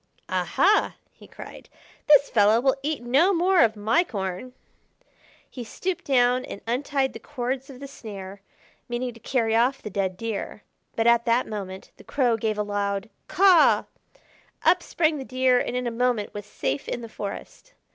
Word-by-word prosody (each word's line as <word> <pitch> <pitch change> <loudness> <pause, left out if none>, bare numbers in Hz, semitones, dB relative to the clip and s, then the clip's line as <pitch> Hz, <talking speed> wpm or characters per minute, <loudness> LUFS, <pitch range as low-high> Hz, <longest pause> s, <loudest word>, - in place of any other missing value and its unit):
"Aha!" - - +2 0.2
he - - -17
cried, - - -12 0.4
"this 285 -1 +6
fellow 215 +1 +4
will 265 +2 +2
eat 295 -2 -3
no 275 +11 +3
more 360 +1 +3
of 220 -1 +3
my 220 +10 +2
corn." 200 - -5 0.9
He 250 - -8
stooped 360 +10 -4
down 250 -1 +3
and 200 - -8
untied 265 +2 -1
the 225 - -8
cords 260 0 -4
of 260 -2 -11
the 280 - -8
snare, 200 -6 -9 0.5
meaning 240 +1 -3
to 230 - -15
carry 225 -2 0
off 250 +4 +2
the 210 - -6
dead 190 -2 -2
Deer; 220 -1 -5 0.3
but 225 - 0
at 235 0 +4
that 235 +2 +2
moment 190 -3 -7
the - - -15
Crow 250 -5 +1
gave 220 -1 -2
a 210 - 0
loud 205 0 -3 0.2
"Caw!" 370 -4 +5 0.8
Up 360 - +4
sprang 315 -4 0
the - - -5
Deer 255 -1 +2
and 245 - -3
in 250 0 -2
a 240 - -1
moment 235 -2 -1
was 205 0 -8
safe 135 -8 -3
in 240 - -3
the 230 - -7
forest. 220 - -8
240 Hz, 175 wpm, -25 LUFS, 210-270 Hz, 0.9 s, this